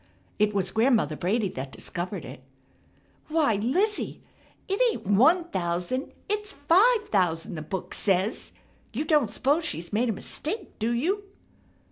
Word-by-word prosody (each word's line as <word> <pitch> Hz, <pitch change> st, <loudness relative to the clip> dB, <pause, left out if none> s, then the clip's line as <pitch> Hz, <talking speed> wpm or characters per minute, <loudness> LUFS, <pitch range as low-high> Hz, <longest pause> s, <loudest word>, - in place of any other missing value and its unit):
It 210 Hz, 0 st, +3 dB
was 190 Hz, -3 st, -1 dB
Grandmother 220 Hz, -, +2 dB
Brady 200 Hz, +7 st, 0 dB
that 135 Hz, -4 st, -6 dB
discovered 180 Hz, 0 st, -5 dB
it: -, -, -9 dB, 0.9 s
"Why, 310 Hz, -9 st, +2 dB
Lizzie! 365 Hz, -, 0 dB, 0.4 s
It 390 Hz, +4 st, 0 dB
ain't -, -, -7 dB
one 265 Hz, -, +5 dB
thousand, 180 Hz, +8 st, -2 dB, 0.2 s
it's 420 Hz, -1 st, -2 dB
five 415 Hz, +10 st, +4 dB
thousand, 175 Hz, -4 st, +1 dB
the 155 Hz, -, -5 dB
book 180 Hz, +4 st, -5 dB
says! 195 Hz, +1 st, 0 dB, 0.4 s
You 285 Hz, +7 st, -2 dB
don't 295 Hz, -8 st, +3 dB
'spose 285 Hz, +9 st, +1 dB
she's 175 Hz, -, -2 dB
made 235 Hz, +3 st, +2 dB
a -, -, +1 dB
mistake, 355 Hz, -, -5 dB
do 225 Hz, +1 st, 0 dB
you?" 365 Hz, +13 st, 0 dB
230 Hz, 140 wpm, -27 LUFS, -, 0.9 s, one